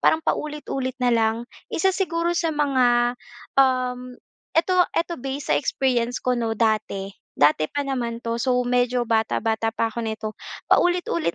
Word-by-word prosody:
parang 315 0 +3
paulit-ulit 275 -4 -2
na 250 -2 +1
lang. 225 -1 +2 0.3
Isa 380 +3 +1
siguro 345 -2 0
sa 340 -1 0
mga, 250 -4 +2 0.4
um, 250 -1 0 0.4
eto 360 +2 +3
eto 340 +1 -1
base 270 +2 -5
sa - - +5
experience 250 -3 0
ko 250 0 +1
'no 225 -1 -1
dati. 215 -3 0 0.2
Dati 150 +1 +3
pa 285 - -3
naman 240 -4 -3
'to 230 0 -2
so 255 +1 +1
medyo 245 0 +1
bata-bata 225 0 0
pa 225 0 0
ako 225 - -8
nito 220 0 -3 0.4
paulit-ulit 260 - +2
250 Hz, 150 wpm, -23 LUFS, 230-285 Hz, 0.4 s, sa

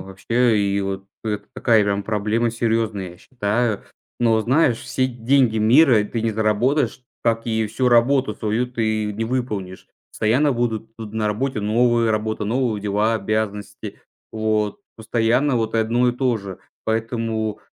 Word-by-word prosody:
вообще. 110 +4 0
И 100 0 0
вот 95 0 -4 0.2
это 105 -2 -3
такая 110 -3 +3
прям 100 0 -1
проблема 110 +2 0
серьезная, 110 -5 -1
я 90 - -14
считаю. 110 -2 -1 0.4
Но 115 -2 +3
знаешь, 125 0 +2
все 130 +1 -1
деньги 120 -1 +2
мира 115 0 +5
ты 115 +1 -4
не 115 - +1
заработаешь, 115 +5 0 0.2
как 115 -1 +1
и 110 -1 0
всю 120 +4 0
работу 120 -1 +3
свою 110 +3 -1
ты 110 -3 -1
не 110 +2 -3
выполнишь. 110 -7 -4 0.2
Постоянно 130 +7 +2
будут 115 -2 -2
тут 110 -2 -8
на 110 -1 0
работе 110 +2 -1
новые 115 +2 +2
работы, 110 0 -2
новые 115 -1 0
дела, 105 +2 +1
обязанности. 105 -1 -3 0.3
Вот 110 -1 -1 0.2
постоянно 120 +4 +1
вот 110 0 -1
и - - +3
одно 120 +3 +2
и - - +1
то 125 -2 0
же. 100 -2 -8 0.3
Поэтому 110 -1 -2
110 Hz, 150 wpm, -21 LUFS, 105-120 Hz, 0.4 s, мира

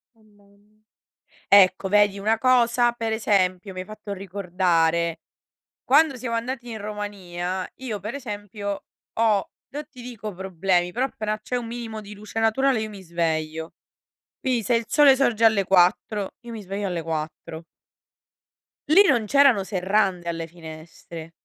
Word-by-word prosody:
Oh 220 - -27
mamma. 205 0 -27 0.7
Ecco, 195 -1 +6
vedi 205 0 +3
una 220 +3 +1
cosa, 240 -1 +3
per 230 -1 -3
esempio, 190 -3 +1
mi 185 - -7
hai 185 - -5
fatto 215 -1 -7
ricordare, 175 -4 0 0.6
quando 285 0 +4
siamo 235 -1 -3
andati 240 +1 -4
in 220 - -5
Romania, 190 -3 -4
io 250 -5 -5
per 215 +5 -5
esempio, 205 -5 -5 0.3
ho 220 -3 +1 0.2
no 295 +2 -5
ti 255 -4 -13
dico 220 -4 -7
problemi, 180 -1 0
però 250 +5 0
appena 215 -4 -4
c'è 250 +3 -3
un 240 -1 -3
minimo 230 -2 -6
di 205 0 -11
luce 210 +2 -6
naturale, 245 +2 +2
io 220 - -3
mi 200 -2 -10
sveglio. 160 -2 -2 0.7
Quindi, 255 -3 0
se 235 +3 +2
il 230 - -1
sole 280 +2 +6
sorge 235 -4 +2
alle 215 -3 +5
4, 190 +2 +2
io 235 -1 -10
mi 220 -2 -7
sveglio 200 +1 -4
alle 175 -3 -3
4. 160 0 -5 1.3
Lì 370 +7 +8
non 240 -8 +3
c'erano 275 -6 +5
serrande 190 -1 0
alle 165 -1 -3
finestre. 160 0 -11
205 Hz, 150 wpm, -24 LUFS, 180-230 Hz, 1.3 s, Lì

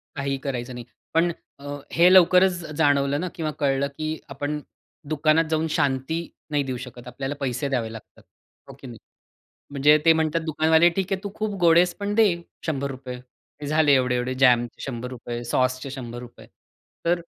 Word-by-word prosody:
काहीही 140 -1 -2
करायचं 125 -2 -4
नाही. 120 -1 -8 0.3
पण 170 +1 +3 0.3
अ, - - -14 0.3
हे 170 - +4
लवकरच 185 +1 +6 0.2
जाणवलं 145 -2 +2
ना 185 - -2
किंवा 160 -2 -2
कळलं 140 -1 +1
की 155 - -3 0.2
आपण 145 +2 -3 0.5
दुकानात 155 +1 +3
जाऊन 160 0 0
शांती 140 0 0 0.3
नाही 145 -1 +1
देऊ 130 -2 -4
शकत. 125 0 -12
आपल्याला 135 +3 -5
पैसे 135 +1 -2
द्यावे 120 -5 -1
लागतात. 115 - -13 0.5
हो - - -9
की 135 - -10
नाही? 120 -2 -9 0.7
म्हणजे 145 +2 +5
ते 165 - +7
म्हणतात 160 0 0
दुकानवाले 160 +2 +4
ठीक 190 0 -2
आहे 190 - -2
तू 200 - -4
खूप 215 -1 -3
गोड 165 -1 +6
आहेस 175 0 +4
पण 205 0 -2
दे, 225 -1 +6 0.4
₹100. 135 -4 -4 0.5
झाले 150 -1 +4
एवढे-एवढे 125 -1 +1
जॅमचे 125 -2 +2
₹100 125 -1 -6
रुपये, 120 - -5
सॉसचे 130 +2 0
₹100 120 -2 -9 0.6
तर 170 +1 +2
140 Hz, 160 wpm, -24 LUFS, 130-160 Hz, 0.7 s, ते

